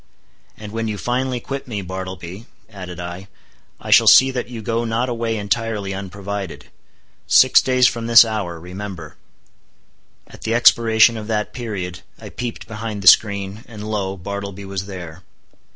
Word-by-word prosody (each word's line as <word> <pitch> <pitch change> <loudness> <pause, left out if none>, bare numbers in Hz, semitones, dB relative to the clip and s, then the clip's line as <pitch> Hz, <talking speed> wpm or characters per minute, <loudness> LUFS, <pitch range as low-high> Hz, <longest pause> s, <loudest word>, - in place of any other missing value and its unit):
"And 105 -1 -9
when 115 0 -3
you 105 -1 -3
finally 125 +2 -2
quit 135 +3 -6
me, 105 -5 -4
Bartleby," 95 +2 -7 0.2
added 90 -3 -9
I, 90 +2 -7 0.5
"I - - -7
shall - - +6
see 130 0 +8
that 125 -2 -4
you 115 -3 -7
go 115 +2 -1
not 115 +2 -1
away 115 -2 -2
entirely 105 -1 -2
unprovided. 100 -1 -6 0.6
Six 130 - +6
days 130 -1 +3
from 115 -1 -3
this 115 0 +8
hour, 100 -7 -4
remember." 90 -2 -8 1.1
At - - -16
the 115 - -1
expiration 115 -1 +5
of 105 -1 -7
that 105 -2 -2
period, 100 -7 -5 0.2
I - - -9
peeped 120 -2 -6
behind 110 -2 -6
the - - -1
screen, 100 +1 +4
and 105 -2 -9
lo! 100 -3 -3
Bartleby 100 +1 -6
was 95 0 -5
there. 90 -3 -9
105 Hz, 155 wpm, -20 LUFS, 95-115 Hz, 1.1 s, see